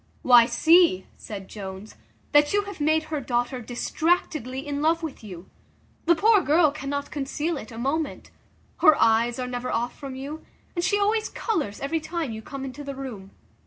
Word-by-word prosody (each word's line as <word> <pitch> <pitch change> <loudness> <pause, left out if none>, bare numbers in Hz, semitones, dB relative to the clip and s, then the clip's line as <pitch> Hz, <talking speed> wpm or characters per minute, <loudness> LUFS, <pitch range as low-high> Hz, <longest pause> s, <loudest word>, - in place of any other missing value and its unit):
"Why, 240 -2 +7
see," 330 - +4
said 195 -3 -8
Jones, 195 0 -8 0.4
"that 295 +2 +4
you 410 0 +2
have 400 -6 -8
made 315 +1 +2
her 300 - -1
daughter 245 0 -1
distractedly 265 +1 -1
in 290 0 -3
love 330 +2 +2
with 305 -7 -6
you. 185 -3 -10 0.6
The 340 - +6
poor 420 +3 +5
girl 310 -1 +4
cannot 285 0 -4
conceal 295 +3 -2
it 230 -6 -8
a 225 - -9
moment; 280 +5 -2 0.5
her 310 -1 +6
eyes 230 +1 +3
are 255 - -2
never 250 0 -4
off 240 +2 -1
from 270 -2 -8
you, 285 +4 -7 0.3
and 345 - -1
she 410 - +2
always 425 +2 +1
colours 310 - -2
every 320 +4 -1
time 320 -4 -4
you 220 0 -6
come 270 +4 -7
into 270 +2 -7
the 280 -1 -6
room. 235 -8 -7
280 Hz, 180 wpm, -25 LUFS, 240-320 Hz, 0.6 s, Why